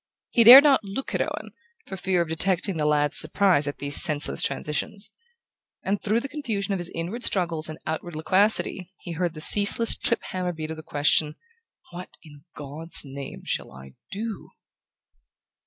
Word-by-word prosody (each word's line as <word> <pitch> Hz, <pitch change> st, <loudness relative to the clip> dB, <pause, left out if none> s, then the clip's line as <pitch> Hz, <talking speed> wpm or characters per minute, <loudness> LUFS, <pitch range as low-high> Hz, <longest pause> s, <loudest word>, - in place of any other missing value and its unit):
He 235 Hz, -, +3 dB
dared 255 Hz, +5 st, +10 dB
not 275 Hz, -6 st, +3 dB
look 205 Hz, +7 st, -7 dB
at -, -, -1 dB
Owen, -, -, -6 dB, 0.3 s
for -, -, -8 dB
fear 185 Hz, -2 st, -1 dB
of -, -, -11 dB
detecting 180 Hz, +2 st, 0 dB
the 150 Hz, -1 st, -1 dB
lad's 150 Hz, -1 st, +1 dB
surprise 180 Hz, -8 st, +2 dB
at 145 Hz, -, -5 dB
these 140 Hz, 0 st, +4 dB
senseless 150 Hz, -2 st, 0 dB
transitions. 175 Hz, +7 st, -4 dB, 0.7 s
And 195 Hz, +1 st, -3 dB
through 220 Hz, +3 st, -1 dB
the 275 Hz, -, -6 dB
confusion 220 Hz, -9 st, -4 dB
of 195 Hz, -, -3 dB
his 175 Hz, 0 st, -3 dB
inward 180 Hz, +9 st, -6 dB
struggles 170 Hz, -4 st, -1 dB
and 155 Hz, -, -8 dB
outward 160 Hz, +1 st, -6 dB
loquacity 185 Hz, +2 st, +2 dB
he 175 Hz, -, -9 dB
heard 170 Hz, 0 st, -4 dB
the 155 Hz, -, -5 dB
ceaseless 205 Hz, +6 st, +5 dB
trip 235 Hz, -, -2 dB
hammer 180 Hz, -1 st, -5 dB
beat 155 Hz, -1 st, -7 dB
of 160 Hz, -, -8 dB
the -, -, -9 dB
question: 150 Hz, 0 st, 0 dB, 0.6 s
"What 180 Hz, +1 st, -9 dB
in 145 Hz, -3 st, -17 dB
God's 150 Hz, +3 st, -4 dB
name 135 Hz, 0 st, -10 dB
shall -, -, -4 dB
I 65 Hz, 0 st, -14 dB, 0.2 s
do?"... 215 Hz, +1 st, -7 dB
175 Hz, 170 wpm, -23 LUFS, 155-200 Hz, 0.7 s, dared